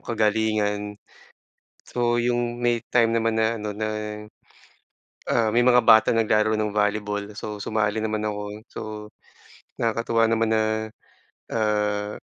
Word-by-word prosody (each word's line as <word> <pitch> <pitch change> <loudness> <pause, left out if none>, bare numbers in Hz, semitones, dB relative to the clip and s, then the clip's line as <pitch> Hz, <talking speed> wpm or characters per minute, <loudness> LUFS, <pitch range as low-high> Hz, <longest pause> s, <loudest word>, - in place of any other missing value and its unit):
kagalingan. 105 -1 0 1.0
So 120 -1 +1
yung 120 0 -1
may 120 -1 +2
time 115 -2 +3
naman 115 -1 +1
na 110 +1 +1
ano 105 -1 -5
na, 110 +1 -2 1.5
ah 115 -2 +2
may 120 - +4
mga 125 -1 +6
bata 110 -2 +6
naglaro 110 -1 +2
ng 110 -1 0
volleyball, 105 0 -1
so 105 0 -6
sumali 110 +1 -1
naman 110 0 -1
ako. 105 -1 -4 0.3
So - - -8 1.0
nakakatuwa 115 0 +1
naman 115 0 +1
na 110 0 +2 0.9
ah, 105 -1 0
110 Hz, 120 wpm, -24 LUFS, 105-115 Hz, 1.5 s, mga